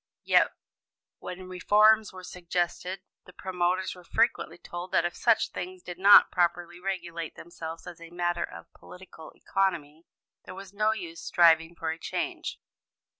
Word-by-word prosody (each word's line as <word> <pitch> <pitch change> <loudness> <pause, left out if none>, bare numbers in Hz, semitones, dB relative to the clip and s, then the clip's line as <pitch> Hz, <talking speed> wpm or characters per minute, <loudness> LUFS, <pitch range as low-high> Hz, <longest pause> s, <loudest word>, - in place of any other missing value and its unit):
Yet, - - +4 0.7
when 185 0 -8
reforms 210 +4 +4
were 185 0 -11
suggested, 180 +1 -3 0.2
the 180 - -15
promoters 185 0 -1
were 180 - -14
frequently - - 0
told 175 +1 -8
that 170 - +3
if 175 - -3
such 230 -2 +2
things 180 0 -7
did 180 0 -8
not 200 +2 +8
properly 175 -1 0
regulate 175 -4 -5
themselves 165 -1 -8
as 175 -2 -10
a 170 - -10
matter 175 0 -1
of - - -10
political 180 -3 -13
economy, 165 -5 -2 0.4
there 185 - -10
was 195 0 -10
no 215 +1 +2
use 175 -6 -6
striving 165 -1 +4
for 165 -1 -3
a 160 - -7
change. - - -4
180 Hz, 150 wpm, -28 LUFS, 170-190 Hz, 0.7 s, not